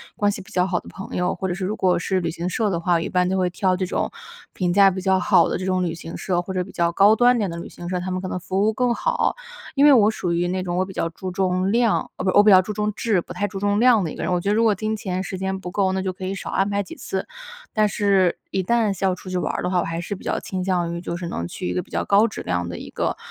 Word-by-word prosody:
关 205 0 +2
系 - - -6
比 - - -12
较 180 +1 +1
好 175 -1 0
的 - - -16
朋 195 - -8
友， 180 - 0
或 190 - -3
者 175 - -2
是 190 0 -3
如 210 - -2
果 180 -3 +2
是 185 +2 0
旅 170 -2 -2
行 170 +2 -4
社 215 +3 0
的 170 -4 -1
话， 175 +1 +1
我 165 - +3
一 - - -3
般 180 0 +2
都 190 - 0
会 185 -1 +1
挑 185 +1 +1
这 185 - -2
种 185 - -2 0.4
评 180 -2 0
价 195 +1 +6
比 190 0 -4
较 190 0 +2
好 - - +4
的 - - -1
这 185 - -5
种 185 -1 +1
旅 170 -2 -2
行 165 0 -8
社， 180 -2 -1
或 185 +2 -4
者 180 -1 0
比 195 - -12
较 170 0 +1
高 200 +5 +5
端 245 +1 +5
点 205 -6 0
的 170 - -6
旅 170 - -6
行 175 0 -8
社， 180 -1 -1
他 185 +1 -4
们 185 0 -2
可 185 - -4
能 180 - -3
服 190 +2 -2
务 220 - +3
更 245 +1 +1
好。 - - 0 0.4
因 280 - +3
为 295 - +8
我 220 -5 +6
属 180 -5 -3
于 175 +1 +1
那 185 0 -1
种 180 -1 -3
我 185 - +1
比 190 - -10
较 165 - -1
注 185 +2 -6
重 185 +1 0
量 235 -1 +3 0.2
哦 - - -4
不 185 - +3
我 205 - +8
比 210 - +6
较 185 - +8
注 200 +3 -6
重 210 0 -1
质， 215 -3 +1
不 175 - -7
太 195 +3 -1
注 195 0 -6
重 205 +1 +1
量 235 -4 +5
的 160 - -3
一 - - -8
个 - - -6
人。 - - -1
我 180 - +2
觉 200 +3 -2
得 210 - +2
如 230 - +3
果 215 -2 +4
金 215 +3 -2
钱 185 -2 -3
时 190 - -5
间 190 0 -2
不 180 -1 -7
够， 190 -2 +1
那 190 - -1
就 185 -1 -2
可 185 - -10
以 195 - -3
少 - - -6
安 195 +1 +1
排 200 0 0
几 185 - -10
次。 190 - -4 0.5
但 215 -1 +3
是 195 -3 +2
一 190 - 0
旦 220 +1 +1
是 190 - -7
要 185 -1 +2
出 185 0 -10
去 180 - -1
玩 165 - -1
儿 - - -3
的 180 - 0
话， 180 - +2
我 - - +1
还 165 0 -3
是 195 +4 -4
比 - - -13
较 - - -1
倾 185 -1 -4
向 175 -3 0
于 170 - -5
就 170 - -4
是 175 - -5
能 85 - -4
去 85 - -5
一 90 - -1
个 90 - -1
比 - - -17
较 - - -2
高 205 +3 +4
质 215 - -7
量 90 -1 -2
的 85 - -6
一 - - -8
个 - - -2
185 Hz, 365 characters per minute, -22 LUFS, 180-205 Hz, 0.5 s, 为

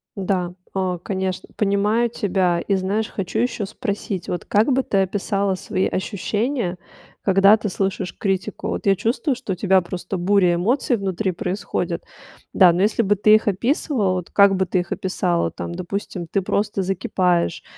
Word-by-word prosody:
Да, 185 -2 -1 0.2
э, 185 -2 0
конечно, 190 -1 -3
понимаю 210 +3 +1
тебя. 185 -5 0
И, 200 - 0
знаешь, 200 +3 -1
хочу 195 +2 -3
ещё 230 -3 -1
спросить. 200 -4 -4
Вот 175 - -4
как 215 +7 +2
бы 265 +1 +2
ты 200 - -1
описала 195 0 -1
свои 185 0 -1
ощущения, 205 +1 -2 0.4
когда 195 +2 +5
ты 215 -1 -3
слышишь 190 -1 -2
критику? 195 +1 -2
Вот - - -4
я 195 -1 +4
чувствую, 250 - 0
что 235 -6 -4
у - - -4
тебя 190 0 +3
просто 180 +2 -5
буря 180 -1 +3
эмоций 235 +7 +1
внутри 195 0 -1
происходит. 180 - -3 0.5
Да, 180 -3 +6
но 175 - 0
если 210 +3 +2
бы 205 0 +2
ты 215 +2 +6
их 215 - +1
описывала, 215 - +1
вот 180 -2 -4
как 200 -1 +5
бы 190 0 +1
ты 185 +1 0
их 175 -1 -5
описала, 180 -2 0
там, - - -6
допустим, 185 0 -4
ты 195 +4 0
просто 200 +1 -1
закипаешь, 180 -2 0
195 Hz, 170 wpm, -22 LUFS, 185-210 Hz, 0.5 s, Да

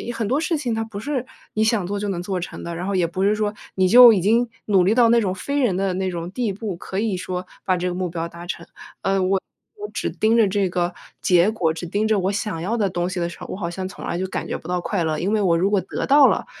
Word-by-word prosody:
很 225 - -2
多 270 - +2
事 330 0 0
情 255 -6 -2
它 225 - -1
不 220 -2 -9
是 265 -1 -2 0.3
你 215 - +1
想 220 -4 +1
做 200 +3 -3
就 205 - -3
能 180 -3 -3
做 185 0 -2
成 175 - -7
的， 170 - -5
然 175 +3 -4
后 200 - -1
也 180 -2 +2
不 175 +3 -4
是 210 +1 +3
说 210 -1 -1 0.2
你 185 -1 +3
就 240 +2 +10
已 195 - +1
经 230 +6 +3 0.2
努 195 -4 +3
力 205 +4 +3
到 240 -2 +5
那 235 0 +5
种 190 -4 -1
非 280 +9 -2
人 240 -9 +2
的 190 0 0
那 190 0 -1
种 175 0 -5
地 225 -1 -1
步， 200 -3 -5
可 190 - -6
以 205 -2 0
说 180 0 -4 0.2
把 185 - +2
这 180 0 -1
个 - - -3
目 180 0 -2
标 165 0 -4
达 170 +1 -10
成。 170 -1 -5 0.4
呃， 195 0 +1
我 190 +1 +1 0.4
我 420 0 -6
只 - - -2
盯 220 +1 +1
着 225 -3 +5
这 195 -1 0
个 175 0 -1 0.3
结 180 +2 +4
果、 170 -7 0
只 165 +2 -6
盯 205 +5 0
着 220 -1 +2
我 190 +1 0
想 200 -4 -3
要 200 +7 -1
的 205 -4 +1
东 175 -1 -2
西 185 - -4
的 170 - 0
时 - - -11
候， - - -7
我 - - -4
好 175 -4 -3
像 185 +2 -5
从 - - -9
来 - - -2
就 185 - -1
感 185 - -4
觉 - - -3
不 - - -12
到 180 0 0
快 185 -1 -1
乐。 155 -1 -1
因 190 +4 -1
为 215 - +2
我 175 -4 +3
如 185 +4 +2
果 205 -2 +2
得 185 - -4
到 280 -1 +7
了， - - 0
190 Hz, 320 characters per minute, -22 LUFS, 180-220 Hz, 0.4 s, 就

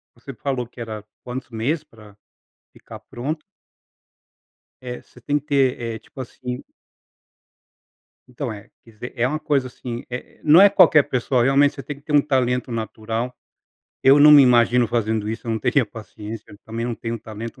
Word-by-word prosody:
você 130 +3 -10
falou 130 -1 -3
que 120 - -12
era 110 -2 -6 0.2
quantos 125 +1 -6
meses 125 +8 -1
para 110 -8 -17 0.6
ficar - - -12
pronto? 150 +6 -5 1.4
É, 125 -1 -7
você - - -20
tem 145 0 0
que 145 - -18
ter, 135 -4 +2
eh, 115 -1 -4
tipo 135 - -13
assim 125 0 -6 1.6
Então, 125 +1 -5
é, 100 -2 -11
quer 115 - -18
dizer, 115 +4 -8
é 120 +1 +2
uma 155 +3 -2
coisa, 140 -4 0
assim, 120 -1 -7
eh, 125 0 -8
não 155 +3 +7
é 200 0 +8
qualquer 160 -6 +6
pessoa, 125 -1 0
realmente 140 +2 +4
você 135 - -8
tem 140 +3 -6
que 140 - -19
ter 150 - -6
um 145 - +7
talento 125 -3 0
natural. 115 +2 -4 0.7
Eu 135 +2 +6
não 150 +1 +9
me 145 -1 +9
imagino 120 -1 +4
fazendo 110 -2 -1
isso, 115 +3 -5
eu - - -1
não 110 - 0
teria 130 +3 +2
paciência, 105 0 -10
também 115 +1 -4
não 120 - -2
tenho 115 +1 -5
talento 110 +1 -8
125 Hz, 175 wpm, -22 LUFS, 115-140 Hz, 1.6 s, não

